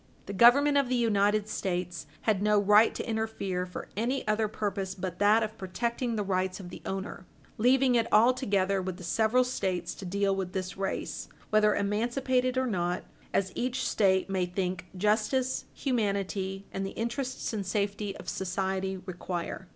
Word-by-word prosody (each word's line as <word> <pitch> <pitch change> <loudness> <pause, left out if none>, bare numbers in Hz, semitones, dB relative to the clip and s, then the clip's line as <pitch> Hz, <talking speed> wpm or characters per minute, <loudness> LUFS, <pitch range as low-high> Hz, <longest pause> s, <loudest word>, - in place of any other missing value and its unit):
The 200 - -6
Government 280 +7 +6
of 270 -3 0
the 255 - +1
United 210 -3 +2
States 175 -6 -3
had 210 -4 +1
no 210 0 +3
right 210 +2 +5
to - - -4
interfere 220 -5 -2
for 180 - -7
any 240 +5 -1
other 215 +1 +2
purpose 200 -2 -3
but 180 -1 -5
that 210 +2 +5
of 215 +1 -5
protecting 235 +5 -2
the 210 - 0
rights 185 -1 -1
of 180 -2 -9
the - - -9
owner, 190 -1 -5 0.3
leaving 255 +2 +4
it 230 -2 +1
altogether 205 -5 +3
with 185 -1 -4
the 185 - -10
several 225 +7 +3
States 190 -8 -2
to - - -10
deal 195 +1 +1
with 185 -1 -4
this 185 -1 -3
race, 195 0 -3 0.2
whether 210 -1 +4
emancipated 250 +5 0
or 260 - +2
not, 180 -6 -1 0.3
as 190 -1 0
each 250 +1 -1
State 190 -3 +2
may 190 -2 0
think 180 -1 -3
justice, 215 +6 +1
humanity, 200 -5 -1
and 195 - -3
the 195 - -6
interests 250 +2 -3
and 210 -2 -2
safety 200 0 -2
of - - -11
society, 190 +1 -2
require. 180 0 -5
200 Hz, 165 wpm, -29 LUFS, 190-230 Hz, 0.3 s, Government